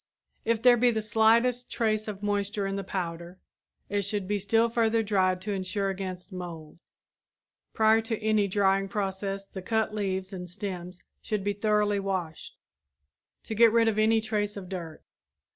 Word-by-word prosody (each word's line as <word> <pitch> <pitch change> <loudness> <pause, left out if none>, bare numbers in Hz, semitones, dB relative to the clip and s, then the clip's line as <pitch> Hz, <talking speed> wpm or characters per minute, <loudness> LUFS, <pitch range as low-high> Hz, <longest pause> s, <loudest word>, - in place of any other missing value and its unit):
If 230 -1 0
there 245 -1 +7
be 245 +1 +4
the 220 -2 -1
slightest 230 +3 +3
trace 215 -2 0
of 205 -1 -6
moisture 205 0 -1
in 195 0 -2
the 195 - -3
powder, 175 -1 -5 0.5
it 205 0 0
should 200 -1 -3
be 205 0 0
still 225 +4 +2
further 230 -1 +1
dried 190 -3 +1
to 210 - -4
insure 195 +1 -1
against 185 0 -6
mold. 170 -3 -8 0.9
Prior 220 0 +4
to 225 0 -3
any 215 -1 +2
drying 195 0 +2
process 195 -1 -3
the 195 -1 -8
cut 220 +2 0
leaves 190 -2 -2
and 180 -1 -6
stems 180 -1 -6 0.2
should 210 -2 -2
be 205 +1 0
thoroughly 210 0 +1
washed, 185 -5 -4 0.9
to - - -5
get 230 +1 +6
rid 230 0 +4
of 215 -1 +1
any 220 +1 +4
trace 210 -2 -2
of 185 -2 -8
dirt. 170 -4 -7
205 Hz, 165 wpm, -28 LUFS, 190-220 Hz, 0.9 s, there